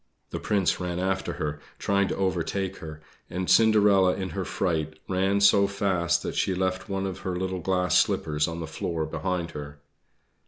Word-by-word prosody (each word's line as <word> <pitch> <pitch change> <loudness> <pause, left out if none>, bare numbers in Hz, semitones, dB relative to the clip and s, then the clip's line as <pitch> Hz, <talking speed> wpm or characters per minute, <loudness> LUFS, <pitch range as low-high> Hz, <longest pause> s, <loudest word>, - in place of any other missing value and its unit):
The - - -3
Prince 100 -3 +1
ran 90 -1 -3
after 95 +1 -1
her, 75 0 -3 0.2
trying 100 0 +1
to - - -2
overtake 95 0 -1
her; 80 -1 -9 0.3
and 90 +1 -3
Cinderella 105 -4 +5
in 95 -1 -4
her 95 0 -3
fright 80 -5 -2
ran 95 +2 +1
so 100 0 +6
fast 90 -4 0
that - - -3
she 95 - 0
left 95 +2 -2
one 95 0 -1
of 95 -1 -4
her 90 -1 -3
little 95 0 -2
glass 90 +1 +2
slippers 75 -1 +1
on 85 0 -5
the - - -3
floor 80 0 -3
behind 85 +1 -3
her. 75 -1 -8
95 Hz, 180 wpm, -26 LUFS, 85-95 Hz, 0.3 s, so